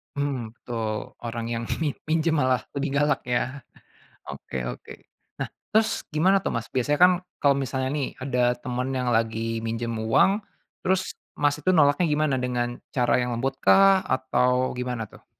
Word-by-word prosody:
Mhm, 130 -6 -3
betul. 110 -4 -4
Orang 115 -1 -4
yang 115 0 -2 0.2
mi 145 - +1 0.2
minjem 160 -1 +2
malah 130 -3 +2
lebih 140 0 -2
galak 145 +1 +2
ya? 130 +2 -1 0.7
Oke 65 - -5
oke. - - -9 0.5
Nah, - - -2 0.2
terus 220 0 +2
gimana 185 +6 +4
tuh - - -1
Mas, 115 0 -3
biasanya 140 +4 0
kan 180 +1 +9 0.3
kalau 140 -1 +4
misalnya 130 -1 -2
nih 140 - -1
ada 130 -1 -1 0.2
teman 125 +1 -3
yang 125 -1 -1
lagi 115 0 0
minjem 115 +1 -2 0.2
uang, 195 - +3 0.4
terus 185 0 +3 0.4
Mas 145 0 +3
itu 170 +5 +1
nolaknya 150 +1 +4
gimana, 150 -2 +1
dengan 120 -1 -2 0.2
cara 125 -2 +2
yang 125 -1 -1
lembut 135 +3 -2
kah 195 -1 +6
atau 130 -1 +1
gimana 125 -4 -3
tuh? - - -17
130 Hz, 160 wpm, -25 LUFS, 120-145 Hz, 0.7 s, kan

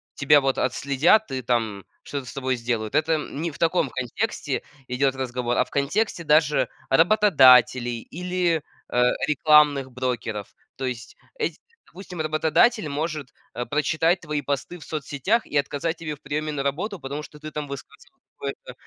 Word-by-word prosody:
тебя 145 0 +5
вот 135 -1 0
отследят, 140 - +2
ты 130 -2 -4
там 110 -5 -1 0.2
что-то 140 -2 -5
с - - -9
тобой 130 -1 -1
сделают. 115 -3 -3
Это 160 +1 +2
не 155 +2 -4
в - - -14
таком 165 -4 +2
контексте 135 - -3 0.2
идет 135 +1 +1
разговор, 125 -2 -2
а - - +3
в - - -20
контексте 170 +6 0
даже 150 0 +3 0.2
работодателей 130 - +5
или, 175 -2 -1 0.3
э, 125 - +2 0.3
рекламных 150 -3 +4
брокеров. 120 -5 -3 0.2
То 135 - -3
есть 120 -2 -5 0.2
эти 440 - -2 0.3
допустим, 180 -3 -8
работодатель 155 +6 +2
может, 150 -1 -3 0.2
э, 120 - -3
прочитать 160 +4 +1
твои 150 -3 -3
посты 140 +6 -3
в - - -11
соцсетях 155 - -1
и - - -8
отказать 145 +4 -1
тебе 155 -2 -5
в - - -27
приеме 150 +1 -2
на 140 -2 -3
работу, 175 +8 -2
потому 140 +3 -5
что 150 - -12
ты 155 0 -8
там 150 -1 -4
высказывал 140 -1 -11 0.2
какое-то - - -7
145 Hz, 160 wpm, -24 LUFS, 130-160 Hz, 0.3 s, тебя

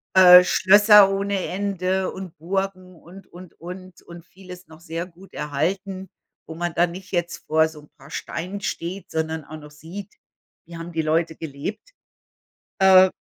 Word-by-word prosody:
Äh, 180 -1 +9
Schlösser 205 +2 +6
ohne 200 0 -1
Ende 190 0 -2
und 190 -3 -9
Burgen 185 +1 -4
und, 180 +4 -15
und, 180 0 -14
und. 185 +1 -10
Und 170 0 -13
vieles 180 0 -13
noch 160 0 -15
sehr 165 0 -5
gut 185 +2 -18
erhalten, 185 +5 -3 0.4
wo 160 - -8
man 175 0 -3
dann 175 +1 +2
nicht 185 +2 -11
jetzt 175 -2 -3
vor 160 +1 +3
so 155 -1 -12
'n 150 - -20
paar 140 - -16
Steinen 185 +5 -6
steht, 180 +2 -5
sondern 160 -1 -3
auch 155 - -9
noch 150 -1 -13
sieht: 175 +7 -10 0.5
Wie 170 +1 -12
haben 165 +1 -8
die 165 -1 -1
Leute 160 +1 0
gelebt. 160 - -7 0.9
Äh, 190 -1 +7
180 Hz, 165 wpm, -22 LUFS, 165-190 Hz, 0.9 s, Äh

